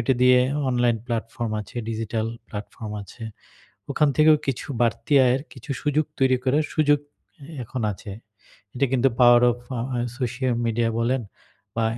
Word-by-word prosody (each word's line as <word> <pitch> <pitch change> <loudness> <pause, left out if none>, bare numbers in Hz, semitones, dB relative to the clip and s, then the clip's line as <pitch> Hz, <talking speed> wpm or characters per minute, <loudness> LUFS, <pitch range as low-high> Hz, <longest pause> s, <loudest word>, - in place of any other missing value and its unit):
ওটা 120 +3 +2
দিয়ে 125 0 +7 0.3
online 120 -2 +2
platform 115 -1 -3
আছে, 105 - -12
ডিজিটাল 110 0 -2 0.2
প্লাটফর্ম 105 +1 -7
আছে। 115 +4 -11 0.7
ওখান 150 -1 +3
থেকেও 155 0 +6
কিছু 135 -3 -2
বাড়তি 120 +5 0
আয়ের 125 +2 +2
কিছু 130 +2 -8
সুযোগ 150 +1 +1
তৈরি 130 -1 +4
করার 140 +4 +2
সুযোগ 145 -2 +4 0.4
এ - - -9 0.2
এখন 120 +2 -5
আছে। 100 +1 -9 0.6
এটা 135 +2 +2
কিন্তু 130 +1 +4
power 120 0 +7
of 120 - -9 0.2
a - - -1 0.2
a - - -1 0.2
social 125 0 -1
media 115 0 +1
বলেন 125 +2 +1 0.5
বা 115 - +1
125 Hz, 155 wpm, -24 LUFS, 115-135 Hz, 0.7 s, দিয়ে